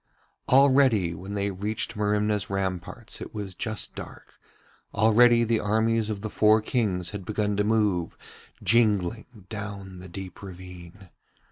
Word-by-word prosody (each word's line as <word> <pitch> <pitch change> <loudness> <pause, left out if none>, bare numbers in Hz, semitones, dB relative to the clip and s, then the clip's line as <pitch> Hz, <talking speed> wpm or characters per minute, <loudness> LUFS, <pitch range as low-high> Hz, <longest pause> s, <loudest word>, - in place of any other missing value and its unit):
Already 130 -9 +5
when 95 +5 -7
they 100 0 -1
reached 105 +3 -2
Merimna's 105 -1 0
ramparts 95 +4 -4
it - - -8
was 100 -3 -5
just 110 +4 -4
dark, - - -11 0.6
already 115 +3 +5
the 115 -1 +1
armies 110 +1 +1
of 105 -2 -3
the 110 - -4
four 110 0 +5
Kings 100 -7 -1
had 100 -2 -6
begun 105 +1 -1
to 105 - +2
move, 105 -5 +1 0.5
jingling, 110 -1 +1
down 100 -3 -7
the 90 0 -10
deep 95 0 -8
ravine. 90 0 -11
105 Hz, 135 wpm, -26 LUFS, 95-110 Hz, 0.6 s, Already